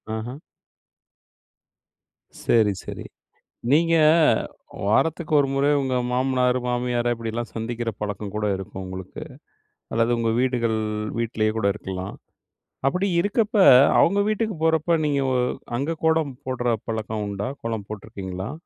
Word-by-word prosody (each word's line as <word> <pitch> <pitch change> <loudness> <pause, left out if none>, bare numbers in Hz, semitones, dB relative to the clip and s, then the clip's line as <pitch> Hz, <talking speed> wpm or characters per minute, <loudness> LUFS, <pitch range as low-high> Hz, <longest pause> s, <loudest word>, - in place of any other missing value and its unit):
ஆஹ. 120 +4 -5 2.1
சரி 110 -4 +4
சரி - - -7 0.7
நீங்க, 165 +3 +4 0.9
வாரத்துக்கு 155 - +1
ஒரு 140 -1 +2
முறை 140 +1 +2
உங்க 130 -1 -1 0.2
மாமனாரு, 125 0 +2
மாமியாரை 120 -1 0
இப்படியெல்லாம் 115 +1 -4
சந்திக்கிற 115 +1 -3
பழக்கம் 105 -1 -4
கூட 105 0 -1
இருக்கும் 95 0 -7
உங்களுக்கு. 95 0 -8 0.7
அல்லது 115 +1 +2
உங்க 115 -1 +1
வீடுகள் 120 -3 +1 0.4
வீட்லயே 110 -2 0
கூட 100 -2 +1
இருக்கலாம். 95 -2 -6 0.7
அப்படி 185 +6 0
இருக்கப்ப 210 +3 0 0.4
அவுங்க 200 +4 +4
வீட்டுக்கு 215 -1 -1
போறப்போ 160 +1 +2
நீங்க 140 -2 +1
வ - - +1 0.4
அங்க 155 +5 -2
கோலம் 160 -3 +2
போடுற 125 -1 -2 0.2
பழக்கம் 110 -1 -3
உண்டா? 100 +2 -3
கோலம் 110 -3 -3
போட்ருக்கீங்களா? 95 -1 -6
120 Hz, 115 wpm, -24 LUFS, 110-140 Hz, 2.1 s, சரி